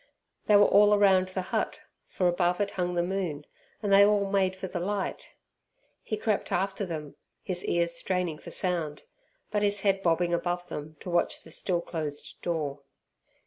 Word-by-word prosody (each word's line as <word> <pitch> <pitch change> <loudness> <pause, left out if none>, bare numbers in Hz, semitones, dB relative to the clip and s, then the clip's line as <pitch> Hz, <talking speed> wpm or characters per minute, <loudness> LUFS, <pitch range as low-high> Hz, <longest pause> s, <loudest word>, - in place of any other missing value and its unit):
They 210 - +6
were 205 0 +7
all 205 +1 +6
round 190 -2 +4
the 185 0 -4
hut, - - -1 0.3
for 180 - 0
above 175 +1 +1
it 200 -1 0
hung 180 -1 -2
the 175 - +2
moon, 175 -6 -3 0.4
and 200 -1 +2
they 200 +1 +8
all 200 -1 +3
made 190 -2 +2
for 190 - -6
the 180 -1 -4
light. 195 +2 -3 0.7
He 215 - -3
crept 215 -1 -1
after 195 +1 -1
them, 155 -4 -6 0.3
his 180 -1 -3
ears 170 0 +1
straining 175 -2 -2
for - - -10
sound, 170 -5 -2 0.5
but 210 -1 +1
his 205 -1 +1
head 195 -1 +2
bobbing 175 0 +2
above 175 +1 -1
them 150 +1 -6
to 180 - -6
watch 175 - 0
the - - -13
still 175 -3 -1
closed 155 -4 -5
door. 150 -5 -2
180 Hz, 180 wpm, -28 LUFS, 170-195 Hz, 0.7 s, they